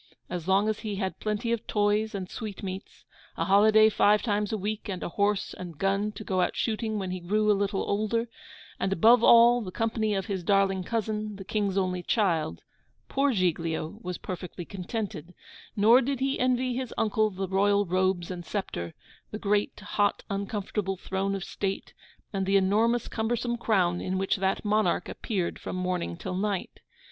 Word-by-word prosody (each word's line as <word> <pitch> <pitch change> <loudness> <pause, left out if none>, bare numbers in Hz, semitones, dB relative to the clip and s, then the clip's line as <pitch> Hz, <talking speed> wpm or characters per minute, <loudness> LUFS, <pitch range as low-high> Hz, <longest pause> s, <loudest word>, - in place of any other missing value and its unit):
As 175 -1 -4
long 195 +2 +3
as 215 -1 -1
he 210 -2 -4
had 190 -1 -3
plenty 215 +2 -2
of 235 -2 -2
toys 210 +1 +1
and 190 -2 -4
sweetmeats, 195 -2 -7 0.3
a - - 0
holiday 215 +2 +6
five 210 0 +3
times 210 -2 0
a 220 - 0
week 210 +2 -4
and 185 -2 -4
a - - -3
horse 200 +2 0
and 175 -4 -8
gun 200 +4 0
to 210 - -8
go 185 -3 0
out - - 0
shooting 220 -1 -1
when 190 -2 -3
he 185 - -3
grew 210 +4 +2
a - - +6
little 200 0 0
older, 215 +3 0 0.5
and, 190 - 0
above 225 +6 +5
all, 235 +1 +7
the 195 - -5
company 220 +1 -1
of 195 - -1
his 195 -4 -3
darling 195 -1 +2
cousin, 215 -1 -2
the 195 - -8
King's 200 -1 -1
only 185 -2 0
child, 170 - 0 0.5
poor 275 +1 +2
Giglio 170 -2 -1
was 180 -1 -4
perfectly 180 -1 -6
contented; 185 -3 -5 0.4
nor 225 +4 +6
did 270 +1 -2
he 270 +1 0
envy 255 0 +1
his 255 -2 -3
uncle 215 0 +2
the 190 -1 -4
royal 200 +2 +2
robes 185 -1 0
and 175 -1 -6
sceptre, 125 - -4 0.3
the 215 - -5
great 205 -1 0
hot 205 0 0
uncomfortable 200 -1 -2
throne 190 +2 -2
of 195 - -4
state, 195 0 -4 0.4
and 195 -1 -1
the 195 0 +4
enormous 220 +5 +2
cumbersome 235 +2 -1
crown 185 -7 +1
in 185 0 -2
which 195 +1 +1
that 190 +2 -1
monarch 215 +1 +1
appeared 190 -7 -3
from - - -5
morning 180 - -2
till 185 - -5
night. 200 0 -2
200 Hz, 180 wpm, -28 LUFS, 185-215 Hz, 0.5 s, all